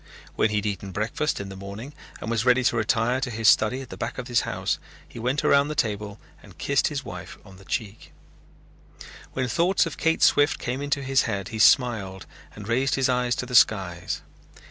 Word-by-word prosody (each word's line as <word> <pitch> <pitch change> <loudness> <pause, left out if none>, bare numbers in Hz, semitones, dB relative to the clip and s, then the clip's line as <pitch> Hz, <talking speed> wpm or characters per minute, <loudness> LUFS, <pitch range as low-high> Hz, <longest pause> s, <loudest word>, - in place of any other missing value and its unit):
When 110 - +2
he 105 - -2
had 105 0 0
eaten 100 -1 -3
breakfast 110 - -2
in 100 -1 -6
the 95 - -8
morning 100 +8 -8 0.3
and 115 - -4
was 115 -1 +1
ready 125 0 +4
to 120 - +2
retire 115 +3 +1
to 130 - -1
his 110 -1 -1
study 115 +6 +4
at 130 - -10
the - - -8
back - - -4
of 125 0 -6
his 120 0 +3
house - - -2 0.3
he - - -11
went 125 +5 -1
around 140 0 +4
the 150 - -4
table 105 -3 -2 0.2
and - - -16
kissed - - +1
his - - -4
wife - - -8
on 95 -1 -14
the 95 - -16
cheek. 110 -5 -5 1.2
When 130 -1 -1
thoughts 175 +8 +2
of 160 -3 -6
Kate 165 0 +1
Swift 145 +1 +4
came 125 +3 -4
into 140 -1 -1
his 135 -1 +3
head, 100 -2 -3
he 110 - -6
smiled 105 -7 +3 0.3
and 105 -1 -9
raised 130 +3 +1
his 135 -1 +1
eyes 125 -1 +1
to - - -3
the 125 - -9
skies. 95 -7 +2
120 Hz, 210 wpm, -25 LUFS, 105-130 Hz, 1.2 s, ready